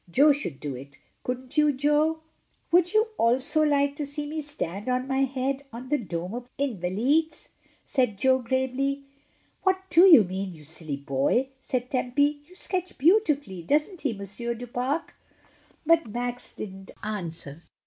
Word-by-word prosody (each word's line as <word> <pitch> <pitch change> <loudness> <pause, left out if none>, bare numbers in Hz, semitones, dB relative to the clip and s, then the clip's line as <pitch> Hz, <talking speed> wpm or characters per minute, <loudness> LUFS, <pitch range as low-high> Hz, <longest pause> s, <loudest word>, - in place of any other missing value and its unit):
Jo 285 - +6
could 275 - -5
do 145 -2 -4
it, 140 +2 -11 0.3
couldn't 255 +2 -5
you, 300 -1 +5
Jo?" 295 +3 +2 0.5
"Would 355 0 +4
you 435 +1 +4
also 255 +6 +3
like 285 -2 +2
to 295 - -3
see 290 +1 -5
me 310 +1 -3
stand 225 - -5
on 255 +1 0
my 270 0 +2
head 270 +1 -2
on 245 +3 -8
the 295 - +2
dome 180 -3 -4
of 245 +1 -6
the 280 - +1
Invalides?" 260 - 0 0.4
said 250 -7 +1
Jo 260 +5 +3
gravely. 260 +3 -1 0.6
"What 380 -1 +2
do 345 +4 +8
you 315 - +9
mean, 185 0 -4
you 155 - -14
silly 155 -1 -5
boy?" 140 - +1
said 250 -1 -3
Tempy. 285 +3 +1
"You 365 - -16
sketch 370 -1 -3
beautifully; 295 - +2
doesn't 300 - 0
he. 280 - 0
Monsieur 210 +4 -5
du 245 +2 -7
Pare?" 255 +6 -1 0.8
But 330 -2 +4
Max 245 +2 -4
didn't 190 -1 -8
answer. 170 -7 -5
260 Hz, 160 wpm, -26 LUFS, 205-295 Hz, 0.8 s, you